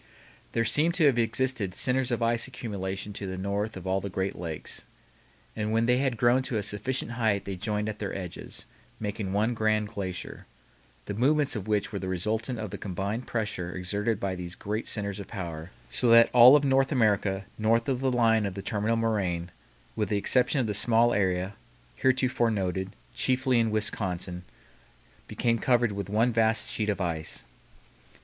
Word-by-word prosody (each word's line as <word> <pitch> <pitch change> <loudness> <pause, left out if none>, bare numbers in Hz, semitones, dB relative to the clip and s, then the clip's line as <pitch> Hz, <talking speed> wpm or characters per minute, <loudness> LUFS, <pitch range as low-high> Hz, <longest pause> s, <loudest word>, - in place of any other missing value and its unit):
There 115 - +1
seem 150 +9 +3
to 170 -3 +3
have 130 -4 +4
existed 115 -4 0
centers 130 +3 +2
of 120 -1 0
ice 115 +1 +1
accumulation 100 -5 -5
to 100 0 -5
the 95 0 -5
north 100 +2 -2
of 95 - -9
all 95 +1 +1
of - - -2
the 100 - -4
great 95 +1 -2
lakes. 85 -3 -5 0.7
And 105 0 -2
when 115 +1 +2
they 125 +1 +3
had 130 -4 0
grown 120 +3 +4
to 130 -3 -2
a 105 - -1
sufficient 120 +5 -2
height 110 -4 0
they 100 - -4
joined 105 +3 -2
at 105 -1 -5
their 100 -2 -3
edges, 90 -3 -7 0.3
making 105 -2 -3
one 105 +4 +1
grand 110 -2 +1
glacier, 95 -5 -6 0.6
the - - -4
movements 140 +6 +2
of 105 -1 -5
which 105 -2 0
were 100 - -3
the 95 - -5
resultant 110 +7 -2
of 110 -3 -5
the 100 - -6
combined 100 +5 -3
pressure 105 -6 -3
exerted 100 +4 -1
by 95 -1 -2
these 90 -1 -6
great 105 +2 -3
centers 100 -2 -2
of 100 - -7
power, 85 -7 -6 0.2
so 125 - +1
that 115 0 +7
all 125 +3 +9
of 145 - +4
North 135 0 +3
America 100 -6 +1
north 115 +2 +2
of 130 -3 0
the 135 0 +1
line 115 -3 +3
of 95 - -6
the 100 - -6
terminal 110 +2 0
moraine, 95 -7 -1 0.4
with 105 -2 -1
the 105 - +1
exception 125 +7 +2
of 120 - 0
a 105 - -1
small 115 +3 +4
area 95 -1 0 0.4
(heretofore 130 -2 +2
noted) 95 -3 -2 0.2
chiefly 130 +1 +2
in 115 -1 +2
Wisconsin, 95 -4 -2 0.8
became 115 -1 0
covered 120 -3 +2
with 100 -1 -5
one 115 +4 +2
vast 110 0 +3
sheet 105 -1 -1
of 100 - -1
ice. 85 -4 -3
110 Hz, 185 wpm, -28 LUFS, 95-120 Hz, 0.8 s, all